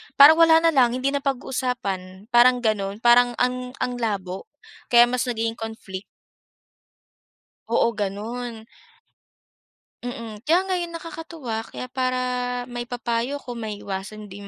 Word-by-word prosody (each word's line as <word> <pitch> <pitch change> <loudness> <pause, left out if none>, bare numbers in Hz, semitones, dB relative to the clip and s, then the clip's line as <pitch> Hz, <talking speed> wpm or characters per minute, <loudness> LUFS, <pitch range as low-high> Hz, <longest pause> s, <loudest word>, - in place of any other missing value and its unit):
parang 310 +4 +9
wala 325 0 +6
na 330 - +5
lang, 250 -4 +3
hindi 260 +2 0
na 280 - 0
pag-uusapan, 245 -7 -3
parang 245 +1 +5
gano'n. 210 -1 -1
Parang 240 0 +5
ang 250 0 -1
ang 245 -1 -3
labo 195 -5 -3 0.4
kaya 240 -1 +7
mas 250 0 0
nagiging 230 -1 -2
conflict. 220 -4 -6 1.7
Oo, 230 0 +2
gano'n. 220 +3 -4 1.4
Mm. 230 -3 -6
Kaya 345 +4 +4
ngayon 355 -3 -2
nakakatuwa, 325 -8 -6
kaya 255 - -8
para 255 -1 0 0.5
maipapayo 240 +1 -2
ko 270 -3 -7
maiiwasan 210 -2 -6
din 200 +1 -9
240 Hz, 120 wpm, -24 LUFS, 215-255 Hz, 1.7 s, parang